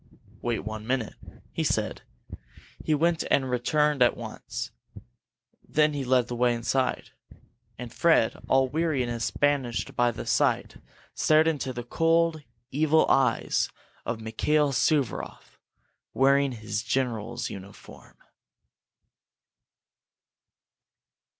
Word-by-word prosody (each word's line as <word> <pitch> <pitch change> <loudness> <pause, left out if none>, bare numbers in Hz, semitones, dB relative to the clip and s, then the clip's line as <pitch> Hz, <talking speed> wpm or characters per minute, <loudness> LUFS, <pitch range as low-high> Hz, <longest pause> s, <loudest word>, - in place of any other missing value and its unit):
"Wait 120 -4 -2
one 110 0 -6
minute," 125 -3 -1 0.4
he - - -2
said. - - -1 0.8
He 155 - +2
went, 165 +2 +1
and 130 -2 +2
returned 150 +3 +1
at 120 - +4
once. - - -6 0.9
Then 150 0 +2
he 140 -2 -3
led 125 -1 +2
the 120 - -4
way 120 0 +2
inside. 125 +3 -1 0.7
And 120 -1 -8
Fred, 165 -9 +3
all 135 0 +4
weariness 130 -6 -1
banished 140 -5 -1
by 120 0 +3
the 120 - -6
sight, - - +1 0.4
stared 155 +1 +3
into 145 -4 -1
the 120 -1 -6
cold, 165 +4 +1 0.3
evil 155 +3 +3
eyes 130 -4 +2 0.3
of 115 -1 -3
Mikail 140 +7 +1
Suvaroff, 135 -3 -1 0.6
wearing 140 0 +3
his 110 -2 -4
general's 120 -2 -2
uniform. 100 +1 -12
130 Hz, 105 wpm, -27 LUFS, 120-150 Hz, 0.9 s, at